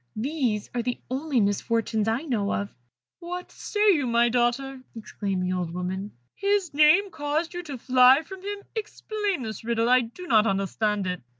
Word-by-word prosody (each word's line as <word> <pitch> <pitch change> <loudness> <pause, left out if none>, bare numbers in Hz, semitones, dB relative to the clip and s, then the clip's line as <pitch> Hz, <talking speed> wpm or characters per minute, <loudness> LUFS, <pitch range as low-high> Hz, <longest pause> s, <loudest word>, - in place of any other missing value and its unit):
These 240 -3 -1
are 240 - 0
the 245 +1 -3
only 275 0 0
misfortunes 215 +1 0
I 225 +6 0
know 220 -9 -1
of." 200 0 -3 0.5
"What 355 +1 -6
say 415 0 +2
you, 290 -6 0
my 235 0 +3
daughter?" 250 +3 0
exclaimed 200 -4 -3
the 180 0 -1
old 180 -2 -2
woman; 190 +3 -4 0.2
"his 400 -4 0
name 310 +7 +5
caused 300 +3 -2
you 350 - -4
to 290 -6 -7
fly 255 +4 +5
from 380 +1 -10
him? 405 +1 -5
Explain 420 - -3
this 220 -2 -6
riddle 230 0 +1
I 255 0 +6
do 240 +10 -8
not 225 -8 +4
understand 195 +1 0
it." 180 -1 -3
250 Hz, 175 wpm, -26 LUFS, 215-320 Hz, 0.5 s, I